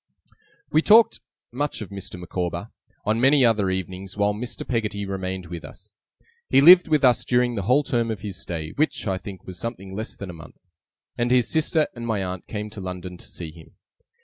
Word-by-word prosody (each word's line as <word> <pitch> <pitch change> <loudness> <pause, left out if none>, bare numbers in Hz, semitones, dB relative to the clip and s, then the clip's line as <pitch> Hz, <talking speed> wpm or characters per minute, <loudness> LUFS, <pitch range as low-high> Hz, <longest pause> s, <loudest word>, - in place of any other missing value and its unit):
We 155 - +4
talked 220 +5 +6 0.3
much 145 +4 -2
of 100 - -10
Mr. 100 -2 -8
Micawber, 90 -1 -4 0.3
on 110 +2 +1
many 135 0 +5
other 105 -4 +3
evenings 95 +1 -4
while 100 0 +2
Mr. 120 +4 -6
Peggotty 105 -4 -1
remained 95 -1 -4
with 85 -1 -7
us. 95 +4 -12 0.6
He - - +5
lived 175 +5 +9
with 155 -3 +2
us 120 -2 +4
during 125 0 +2
the 105 - -2
whole 140 +4 +5
term 120 -4 0
of 110 -4 -4
his 100 -3 -6
stay, 80 -2 -5
which, 155 +2 0
I 95 -1 -1
think, 95 -2 -9
was 90 -2 -8
something 100 -4 -6
less 110 +3 -4
than 100 -2 -6
a - - -11
month, 80 0 -13 0.6
and 120 0 +1
his 125 -1 +3
sister 160 0 +2
and 120 -1 -6
my 105 -4 0
aunt 90 0 -5
came 105 -1 -5
to 105 - -8
London 90 -1 -6
to - - -14
see 85 -3 -7
him. 80 0 -16
105 Hz, 200 wpm, -24 LUFS, 95-125 Hz, 0.6 s, lived